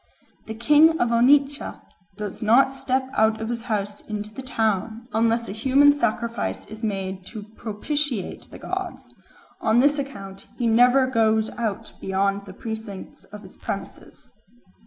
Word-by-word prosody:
The 220 - -5
king 300 +7 +5
of 240 - +2
Onitsha 280 +4 +3 0.4
"does 210 -2 -6
not 245 +5 +4
step 265 -1 -1
out 220 -2 +2
of 220 0 -4
his 235 -1 -3
house 205 -3 -2
into 210 0 -6
the 265 - -7
town 220 -1 -1
unless 230 +1 +2
a - - -5
human 270 +7 +5
sacrifice 230 - -2
is 215 +1 -10
made 195 -3 -3
to 215 -3 -7
propitiate 240 +1 -3
the - - -10
gods: - - -6 0.5
on 220 +2 +3
this 285 +3 +3
account 195 -9 -7
he 240 - -1
never 245 +3 +5
goes 220 -3 +2
out 225 -4 -4
beyond 195 +1 0
the 190 - -9
precincts 220 -2 -8
of 210 +1 -11
his 190 - -14
premises." - - -7
225 Hz, 150 wpm, -24 LUFS, 210-260 Hz, 0.5 s, king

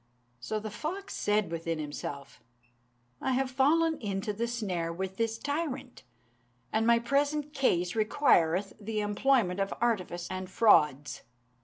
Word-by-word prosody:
So 215 - -3
the 215 0 -6
fox 370 - -5
said 210 -4 +1
within 165 0 -2
himself, 145 -2 -6 0.8
"I 265 - 0
have 260 0 0
fallen 315 +5 +3
into 200 -1 -2
the 230 +3 -2
snare 190 -8 -2
with 190 +2 -5
this 225 0 0
tyrant, 285 -2 -4 0.7
and 225 +1 +2
my 235 0 +6
present 285 +4 0
case 180 - +1
requireth 205 - +2
the 215 +1 -2
employment 205 -2 +2
of 195 0 0
artifice 185 -7 -1
and 185 0 -4
frauds. 150 - +3
215 Hz, 135 wpm, -30 LUFS, 180-265 Hz, 0.8 s, my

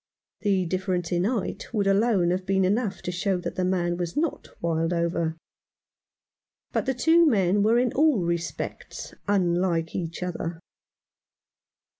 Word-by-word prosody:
The 195 -3 +1
difference 185 -1 -2
in 175 +1 +1
height 225 -2 -2
would 205 -2 +1
alone 195 -3 +3
have 185 +1 -1
been 190 0 +2
enough 205 +1 0
to 180 - -2
show 180 +2 0
that - - -4
the 185 0 -2
man 175 -2 0
was 175 - -4
not 320 0 -1
Wildover, 165 0 0 1.3
but - - -1
the 265 - +1
two 325 +6 +5
men 200 -5 +3
were 220 +3 +4
in 245 -1 +1
all 290 - +3
respects 170 0 -4
unlike 175 -4 +1
each 170 0 -4
other. 170 -2 -4
185 Hz, 140 wpm, -26 LUFS, 175-205 Hz, 1.3 s, two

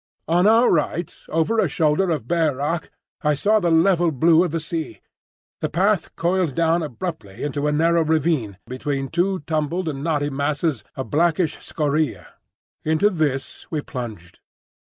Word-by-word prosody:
On 175 +4 +3
our 230 +3 +5
right, 165 +1 0
over 165 +8 +1
a 195 - +3
shoulder 155 +4 +1
of 150 -9 -2
bare 160 -3 +1
rock, 150 +5 -2 0.3
I 150 -1 +2
saw 215 +9 +3
the 175 -4 +1
level 170 +1 +4
blue 160 +4 +4
of 180 - -1
the 165 +2 -2
sea. 155 - -5 0.6
The - - -2
path 195 +3 +1
coiled 175 -4 0
down 165 +1 +2
abruptly 150 - -6
into 145 0 -1
a - - +2
narrow 165 +2 +3
ravine 155 - 0
between 135 +2 -3
two 185 +2 0
tumbled 160 +3 -2
and 140 -3 -3
knotty 145 -3 0
masses 145 -1 -1
of 130 - -6
blackish 165 +1 +2
scoriae. 150 0 -1 0.6
Into 160 +7 +2
this 145 -7 -2
we 155 -2 -2
plunged. 110 -11 -7
160 Hz, 160 wpm, -22 LUFS, 145-170 Hz, 0.6 s, our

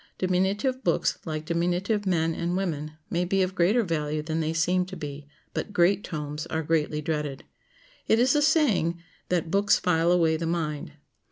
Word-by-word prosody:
Diminutive 195 +8 0
books, - - +1
like 155 -2 -4
diminutive 180 +5 0
men 165 -3 +1
and 170 +2 -2
women, 155 -5 -3 0.2
may 175 +1 +1
be 190 +2 +1
of 185 0 -2
greater 195 +7 +3
value 155 -4 -2
than 160 +1 -2
they 160 0 0
seem 175 +3 +2
to 190 0 -8
be; 145 -2 -7 0.3
but 205 - -4
great 190 +2 +3
tomes 150 -2 -5
are 160 0 -2
greatly 150 -1 0
dreaded. 150 -3 -3 0.6
It 220 - +4
is 250 +4 +3
a 295 - +3
saying 265 - +2 0.3
that 175 -2 0
"books 200 +1 +4
file 170 -1 +2
away 165 -3 +3
the 165 +1 -3
mind." 155 -3 -2
170 Hz, 175 wpm, -26 LUFS, 155-190 Hz, 0.6 s, It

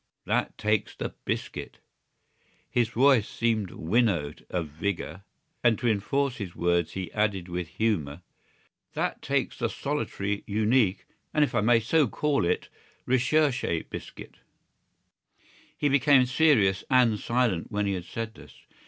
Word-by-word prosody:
That - - -1
takes 105 -1 0
the - - -5
biscuit!" - - -4 0.9
His 120 -2 +1
voice 125 -2 +4
seemed 110 -4 0
winnowed 85 -6 0
of 90 -3 -2
vigour; 85 +2 -4 0.4
and 120 -2 +4
to 120 - -2
enforce 125 +5 0
his 95 -5 -6
words 85 -1 +1
he 95 -3 -5
added 105 -4 0
with 90 -1 -4
humour: 85 -5 -1 0.7
"That - - -2
takes - - -1
the - - 0
solitary, 100 +1 -3
unique, 105 -1 +2 0.3
and, 150 - +5
if 140 - -1
I 120 - +2
may 115 +2 +4
so 140 +6 +2
call 145 -2 0
it, - - 0 0.4
recherché 130 - +1
biscuit!" - - -9 1.4
He 145 - +1
became 140 -1 +5
serious 125 -8 +3
and 120 -5 +4
silent 115 -8 0
when 105 0 0
he 100 - 0
had 90 -2 -4
said 110 +4 -5
this. - - -15
110 Hz, 135 wpm, -27 LUFS, 95-125 Hz, 1.4 s, and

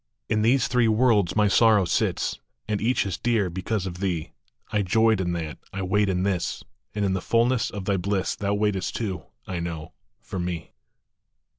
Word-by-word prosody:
In 110 - +2
these 120 +3 +3
three 125 -2 +3
worlds 110 -5 +3
my 105 -1 +4
Sorrow 105 -1 +5
sits, - - 0 0.3
And 105 -1 -1
each 120 +1 +2
is 95 -4 -3
dear 110 -7 +1
because 95 +3 -2
of 90 -2 -6
thee; 90 -5 -2 0.4
I 105 - +2
joyed 110 +2 +3
in 90 -1 -1
that, 80 -3 -4
I 95 -1 -4
wait 100 +2 +2
in 90 -1 0
this, 95 -3 -1 0.3
And 105 -1 0
in 95 - +1
the 95 - -1
fulness 120 +3 +2
of 100 -3 -6
thy 100 -1 +1
bliss 95 +1 -1
Thou 100 0 -1
waitest 100 -2 0
too, 95 -8 -3 0.2
I 90 -2 -4
know, 80 -2 -5 0.3
for 95 - -6
me. 85 -3 -4
100 Hz, 185 wpm, -25 LUFS, 90-110 Hz, 0.4 s, Sorrow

